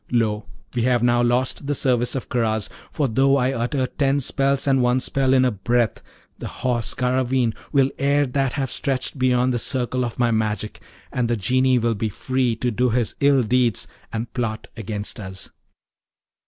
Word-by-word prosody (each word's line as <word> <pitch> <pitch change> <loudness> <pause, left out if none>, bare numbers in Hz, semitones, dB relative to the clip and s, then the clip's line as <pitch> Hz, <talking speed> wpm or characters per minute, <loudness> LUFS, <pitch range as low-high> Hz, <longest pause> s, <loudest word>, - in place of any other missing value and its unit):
Lo, 110 -3 0 0.3
we 120 - 0
have 120 0 +2
now 120 0 +3
lost 125 +3 0
the 145 - 0
service 125 -2 +1
of 130 - -4
Karaz! 110 -4 0 0.2
for 145 -3 0
though 135 +4 +3
I 130 0 +1
utter 130 +2 -1
ten 140 +1 0
spells 135 0 0
and 135 -2 +3
one 125 +1 +3
spell 135 0 0
in 130 -1 +5
a 125 - +2
breath, 115 +2 0 0.4
the - - -5
Horse 120 -3 -1
Garraveen 125 -1 +1 0.2
will 135 -2 +3
ere 140 +1 +3
that 135 0 -1
have 135 -4 -2
stretched 135 0 -2
beyond 125 0 +2
the 120 - 0
circle 125 +1 -1
of 120 -2 -4
my 120 -1 +2
magic, 110 -1 -2 0.3
and 120 -2 -1
the 120 - +1
Genie 130 +5 +2
will 115 -1 +1
be 110 +1 -2
free 130 +3 -1
to 125 +2 -1
do 125 +3 +1
his 120 -1 0
ill 140 -2 +4
deeds 120 -1 +1 0.2
and 115 +1 -4
plot 115 -3 -3
against 105 0 -5
us. 95 -2 -9
125 Hz, 180 wpm, -22 LUFS, 115-130 Hz, 0.4 s, in